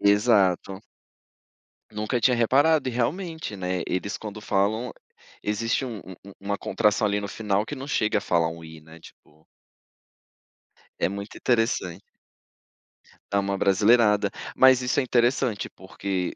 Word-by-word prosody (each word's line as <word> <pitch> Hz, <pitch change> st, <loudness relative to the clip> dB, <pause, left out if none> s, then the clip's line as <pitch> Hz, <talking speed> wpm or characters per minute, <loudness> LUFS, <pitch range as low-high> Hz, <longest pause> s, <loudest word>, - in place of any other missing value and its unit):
Exato. 100 Hz, -3 st, +3 dB, 1.1 s
Nunca 105 Hz, +4 st, -2 dB
tinha 125 Hz, +2 st, +3 dB
reparado, 135 Hz, +5 st, +3 dB
e -, -, -5 dB
realmente, 160 Hz, -, -3 dB
né, 90 Hz, -2 st, -2 dB
eles 100 Hz, +3 st, -2 dB
quando 105 Hz, -1 st, -8 dB
falam, 105 Hz, +4 st, 0 dB, 0.5 s
existe 115 Hz, +5 st, -1 dB
um 115 Hz, -5 st, -6 dB
um 95 Hz, -1 st, -11 dB
um -, -, -13 dB
uma 100 Hz, 0 st, -3 dB
contração, 105 Hz, 0 st, +1 dB
ali, 100 Hz, 0 st, 0 dB
no 100 Hz, -, -4 dB
final, 105 Hz, 0 st, -1 dB
que 145 Hz, -, -6 dB
não 135 Hz, +1 st, -7 dB
chega 110 Hz, -6 st, +1 dB
a -, -, -1 dB
falar 85 Hz, -3 st, +1 dB
um 80 Hz, 0 st, -10 dB
i, 80 Hz, -1 st, -11 dB
né, 80 Hz, +1 st, -15 dB
tipo. 80 Hz, 0 st, -19 dB, 1.6 s
É -, -, +1 dB
muito 100 Hz, +1 st, -7 dB
interessante. 115 Hz, -6 st, 0 dB, 1.3 s
Dá 100 Hz, -, +2 dB
uma 100 Hz, 0 st, -1 dB
abrasileirada. 105 Hz, +1 st, +3 dB, 0.3 s
Mas 130 Hz, -1 st, +6 dB
isso 125 Hz, +3 st, 0 dB
é -, -, +1 dB
interessante, 120 Hz, -3 st, +1 dB
porque 95 Hz, -1 st, -4 dB
105 Hz, 145 wpm, -25 LUFS, 95-120 Hz, 1.6 s, Mas